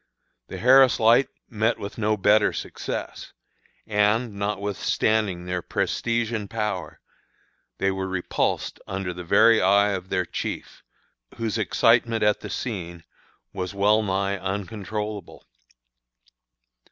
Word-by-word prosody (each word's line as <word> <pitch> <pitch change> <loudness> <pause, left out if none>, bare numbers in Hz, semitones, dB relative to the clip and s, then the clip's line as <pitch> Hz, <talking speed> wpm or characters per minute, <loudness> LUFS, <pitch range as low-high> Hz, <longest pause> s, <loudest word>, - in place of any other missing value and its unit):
The - - -7
Harris 130 +1 +5
Light 120 +4 +5 0.2
met 110 0 0
with 100 +3 -7
no 110 0 +1
better 105 +2 +4
success; - - -6 0.5
and, 105 +2 +1
notwithstanding 100 -1 -1
their 90 0 -2
prestige 115 +5 -1
and 105 -3 -3
power, 105 -8 -3 0.8
they 95 - +1
were 95 0 -3
repulsed 95 -1 -2
under 95 -1 -3
the 90 - -7
very 110 +5 +5
eye 100 +2 +4
of 95 -1 -4
their 90 - 0
chief, - - -6 0.6
whose 115 -1 -2
excitement 115 +2 +2
at 105 0 +3
the - - -8
scene 85 -8 -5 0.5
was 95 0 -5
well 105 +2 +3
nigh 100 -1 -1
uncontrollable. 100 +1 -5
105 Hz, 115 wpm, -24 LUFS, 95-110 Hz, 0.8 s, Harris